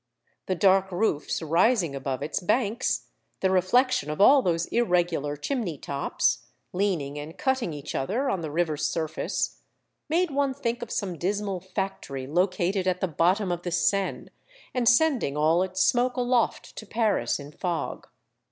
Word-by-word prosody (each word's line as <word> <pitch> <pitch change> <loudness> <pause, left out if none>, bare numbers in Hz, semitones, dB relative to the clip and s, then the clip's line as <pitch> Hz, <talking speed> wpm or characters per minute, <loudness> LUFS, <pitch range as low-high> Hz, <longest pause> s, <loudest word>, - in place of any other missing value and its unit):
The 185 - 0
dark 190 +1 +3
roofs 175 -5 -1
rising 170 - +2
above 135 -1 -3
its 155 - -2
banks, 215 +4 0 0.3
the 190 - +2
reflection 190 - +2
of 150 - -4
all 270 +7 +7
those 170 -5 0
irregular 175 -9 +1
chimney 195 - -2
tops, 140 +1 -1 0.3
leaning 170 -7 -1
and 150 +3 -8
cutting 265 - 0
each 145 -2 -6
other 225 - -1
on 195 -9 -1
the 160 - -4
river's 155 -1 -1
surface, 160 -1 -2 0.5
made 340 +1 +1
one 275 -1 0
think 240 -3 -2
of 240 - -6
some 185 -8 -3
dismal 200 0 -1
factory 190 -8 -4
located 180 +4 0
at 180 -1 +1
the 190 - 0
bottom 180 +5 +1
of 175 -1 -2
the 175 - -3
Seine, 195 +3 0 0.4
and 245 -2 +3
sending 250 - +2
all 160 +3 +3
its 190 0 0
smoke 250 +1 +2
aloft 245 -2 0
to 215 - -8
Paris 220 -7 0
in 145 +1 -9
fog. 175 +1 -4
185 Hz, 155 wpm, -26 LUFS, 160-230 Hz, 0.5 s, all